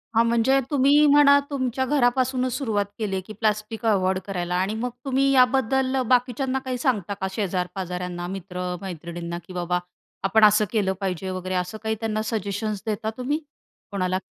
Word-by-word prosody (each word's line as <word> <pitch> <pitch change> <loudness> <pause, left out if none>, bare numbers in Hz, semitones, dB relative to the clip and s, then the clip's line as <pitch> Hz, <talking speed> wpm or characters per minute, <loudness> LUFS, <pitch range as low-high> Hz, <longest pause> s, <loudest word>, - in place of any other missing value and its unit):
हां, 230 - +6
म्हणजे 235 +4 +3
तुम्ही 285 +2 +5
म्हणा 285 0 +7
तुमच्या 260 -2 -1
घरापासूनच 255 -1 +1
सुरुवात 215 -7 0
केली 200 -3 -1
आहे, 190 - -1
की 215 +4 -10
प्लास्टिक 215 +1 -2
अव्हॉइड 190 -3 +2
करायला. 180 -3 -3
आणि 190 +4 0
मग 245 +3 -2 0.2
तुम्ही 270 +1 +2
याबद्दल 265 0 +3
बाकीच्यांना 255 +1 +1
काही 255 -1 -2
सांगता 215 - 0
का 190 - 0
शेजार-पाजाऱ्यांना, 180 -2 -3
मित्र-मैत्रिणींना, 180 -2 -5
की 185 - -9
बाबा 180 0 -1 0.4
आपण 215 +3 +3
असं 210 0 +5
केलं 200 -4 +1
पाहिजे 190 0 -2
वगैरे. 185 0 -3
असं 180 +4 -2
काही 220 0 0
त्यांना 215 -1 -1
सजेशन्स 210 -1 -2
देता 215 +1 -1
तुम्ही 285 +5 -1 0.5
कोणाला? 185 -1 0
215 Hz, 155 wpm, -24 LUFS, 185-255 Hz, 0.5 s, म्हणा